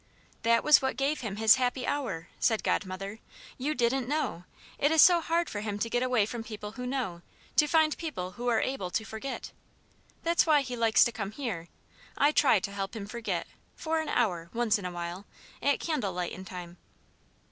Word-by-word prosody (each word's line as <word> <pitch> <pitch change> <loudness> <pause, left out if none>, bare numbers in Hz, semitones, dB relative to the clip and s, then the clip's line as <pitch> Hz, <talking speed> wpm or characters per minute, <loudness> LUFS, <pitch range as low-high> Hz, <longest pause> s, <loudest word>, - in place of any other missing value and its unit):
"That 230 0 +3
was 300 0 +7
what 265 -3 -1
gave 280 +3 0
him 215 -5 -4
his 220 +3 +6
happy 250 +1 0
hour," 190 - -2
said 225 -2 +2
Godmother. 195 +2 -2 0.4
"You 295 +4 -1
didn't 245 +1 +1
know! 285 - -2 0.3
It 290 - +4
is 320 - +3
so 345 +1 +8
hard 335 +1 0
for 205 - -4
him 205 -1 -3
to 230 +2 -2
get 245 - +1
away 250 -5 +2
from 230 +1 -5
people 210 -2 -7
who 250 +2 -6
know 245 -10 -3 0.4
to 300 - +6
find 315 0 +3
people 225 - -5
who 245 +6 -6
are 235 -2 +3
able 260 -9 -2
to 220 +4 -2
forget. 220 +5 -6 0.7
That's 335 0 +3
why 300 -2 +5
he 250 -2 -4
likes 225 -3 +5
to 235 - +1
come 210 -2 -5
here; 210 -11 -4 0.5
I 290 +1 +4
try 265 -8 +4
to 200 - -4
help 195 +1 -4
him 210 -3 -5
forget, 230 +2 -3 0.3
for 320 0 -1
an 315 - -5
hour, 175 -8 0
once 230 -3 +2
in 190 - -7
a 180 - -3
while, 175 +3 -6 0.3
at 285 0 +2
'candle 290 - -1
lightin' 180 +1 -4
time.'" 180 -1 -8
230 Hz, 200 wpm, -29 LUFS, 200-275 Hz, 0.7 s, so